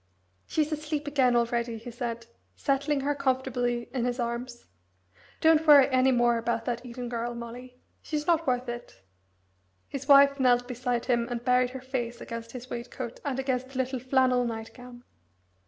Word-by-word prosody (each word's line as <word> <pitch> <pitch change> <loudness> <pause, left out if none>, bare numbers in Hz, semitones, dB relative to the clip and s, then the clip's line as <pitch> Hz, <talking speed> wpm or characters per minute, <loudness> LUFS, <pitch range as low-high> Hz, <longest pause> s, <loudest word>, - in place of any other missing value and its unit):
"She's 310 0 0
asleep 300 -1 -3
again 265 -4 +2
already," 235 0 0
he 230 +2 -9
said, 235 -1 -5 0.3
settling 280 0 0
her 285 +2 0
comfortably 250 -3 -1
in 255 -3 -1
his 245 +1 -2
arms. 240 0 -4 0.8
"Don't 320 0 +4
worry 285 -3 +9
any 260 0 +3
more 240 -1 +3
about 230 0 -2
that 240 -1 -2
Eden 245 0 -6
girl, 240 0 -3
Molly 245 +2 -9 0.2
she's 300 -1 -3
not 330 -2 +2
worth 250 0 0
it." 240 - -8 0.8
His 275 -1 -6
wife 280 0 +7
knelt 245 -1 +3
beside 245 -1 -2
him 235 -2 +1
and 240 -1 -4
buried 250 0 +3
her 260 0 -8
face 245 -2 -4
against 230 0 -7
his 250 -1 -8
waistcoat 240 0 -6
and 275 -3 -2
against 260 -1 -1
the 270 - -9
little 260 0 -1
flannel 255 0 +2
night 225 -2 -5
gown. 245 -1 -12
250 Hz, 170 wpm, -28 LUFS, 240-265 Hz, 0.8 s, worry